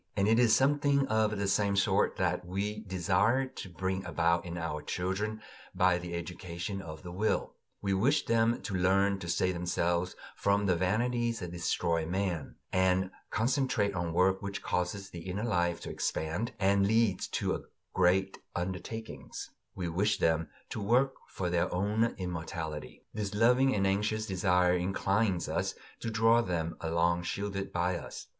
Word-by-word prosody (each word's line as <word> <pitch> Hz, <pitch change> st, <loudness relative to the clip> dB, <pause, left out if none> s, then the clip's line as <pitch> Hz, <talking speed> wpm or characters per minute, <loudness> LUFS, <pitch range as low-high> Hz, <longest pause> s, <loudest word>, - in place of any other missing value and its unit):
And 100 Hz, 0 st, +3 dB
it 115 Hz, +2 st, +4 dB
is 120 Hz, -3 st, +6 dB
something 140 Hz, 0 st, +3 dB
of 110 Hz, -1 st, +2 dB
the 100 Hz, 0 st, -1 dB
same 100 Hz, +1 st, +2 dB
sort 100 Hz, 0 st, +2 dB
that 90 Hz, -1 st, 0 dB
we 100 Hz, +4 st, -3 dB
desire 105 Hz, +6 st, +1 dB
to 115 Hz, -6 st, -8 dB
bring 95 Hz, +2 st, -2 dB
about 85 Hz, -1 st, +1 dB
in 85 Hz, 0 st, -5 dB
our 80 Hz, -2 st, -3 dB
children 105 Hz, +6 st, -2 dB, 0.3 s
by 90 Hz, -1 st, +3 dB
the 90 Hz, -1 st, -5 dB
education 90 Hz, +2 st, -5 dB
of 80 Hz, -3 st, -9 dB
the 90 Hz, -, -7 dB
will; 105 Hz, +5 st, 0 dB, 0.3 s
we 100 Hz, -1 st, +1 dB
wish 125 Hz, +11 st, +2 dB
them 115 Hz, 0 st, +2 dB
to 105 Hz, -, -4 dB
learn 95 Hz, +2 st, +3 dB
to 85 Hz, -, -6 dB
save 90 Hz, +2 st, +1 dB
themselves 85 Hz, 0 st, 0 dB, 0.2 s
from 100 Hz, 0 st, +2 dB
the 90 Hz, -2 st, +3 dB
vanities 115 Hz, +6 st, +1 dB
that 90 Hz, -2 st, -5 dB
destroy 85 Hz, -1 st, 0 dB
man, 90 Hz, -1 st, -2 dB, 0.2 s
and 95 Hz, 0 st, +2 dB, 0.2 s
concentrate 120 Hz, -3 st, +1 dB
on 85 Hz, -2 st, -2 dB
work 95 Hz, +3 st, +3 dB
which 100 Hz, -1 st, -5 dB
causes 95 Hz, +2 st, -2 dB
the 85 Hz, -, -7 dB
inner 95 Hz, +4 st, -4 dB
life 85 Hz, -6 st, +1 dB
to -, -, -6 dB
expand, 85 Hz, +10 st, -2 dB
and 100 Hz, 0 st, +3 dB
leads 110 Hz, -3 st, +2 dB
to -, -, -2 dB, 0.3 s
great 95 Hz, +2 st, +2 dB, 0.2 s
undertakings; 95 Hz, +5 st, -5 dB, 0.2 s
we 90 Hz, -, -3 dB
wish 100 Hz, +5 st, +1 dB
them 80 Hz, 0 st, +1 dB, 0.2 s
to 110 Hz, -, -3 dB
work 125 Hz, +6 st, +3 dB
for 90 Hz, -, -3 dB
their 85 Hz, -1 st, +1 dB
own 105 Hz, +5 st, +1 dB
immortality. 80 Hz, -4 st, -5 dB
This 105 Hz, -1 st, -3 dB
loving 125 Hz, +4 st, +4 dB
and 100 Hz, -1 st, +2 dB
anxious 105 Hz, +3 st, +1 dB
desire 90 Hz, -2 st, +2 dB
inclines 95 Hz, +1 st, +1 dB
us -, -, -1 dB, 0.2 s
to 115 Hz, -, -3 dB
draw 115 Hz, +1 st, +4 dB
them 85 Hz, -5 st, -2 dB
along 85 Hz, +1 st, +1 dB
shielded 100 Hz, +2 st, -3 dB
by 90 Hz, +1 st, 0 dB
us. -, -, -8 dB
95 Hz, 160 wpm, -31 LUFS, 90-105 Hz, 0.3 s, is